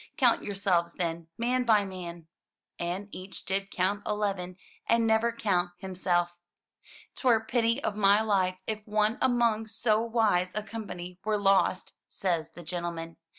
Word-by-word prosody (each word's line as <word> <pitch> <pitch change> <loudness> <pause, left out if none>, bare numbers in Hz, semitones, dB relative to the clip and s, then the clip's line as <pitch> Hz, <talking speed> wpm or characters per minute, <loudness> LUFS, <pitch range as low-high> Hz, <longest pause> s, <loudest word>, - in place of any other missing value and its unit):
"Coimt 250 -5 +4
yourselves, 185 -4 0
then, 170 -2 -3
man 250 +2 +1
by 215 -4 +4
man 175 -3 -7 0.2
!' - - -64
' - - -56
And 180 +4 -3
each 190 +1 -7
did 195 +1 -1
count 195 +3 0
eleven 195 -4 -2 0.3
and 230 0 +3
never 225 +1 +3
count 180 -6 0
himself. 175 -2 -1 0.4
" - - -21
Twere 235 -4 +3
pity 235 +2 +1
of 205 - -1
my 200 0 +5
life 190 -4 +1
if 215 -1 -3
one 215 +2 +1
among 235 -4 +2
so 220 0 +1
wise 220 -6 +2
a 215 - -1
company 190 -5 -7
were 215 0 +1
lost," 195 -2 +2
says 170 -5 -1
the 175 - -10
gentleman. 170 -1 -4
200 Hz, 155 wpm, -29 LUFS, 180-220 Hz, 0.4 s, my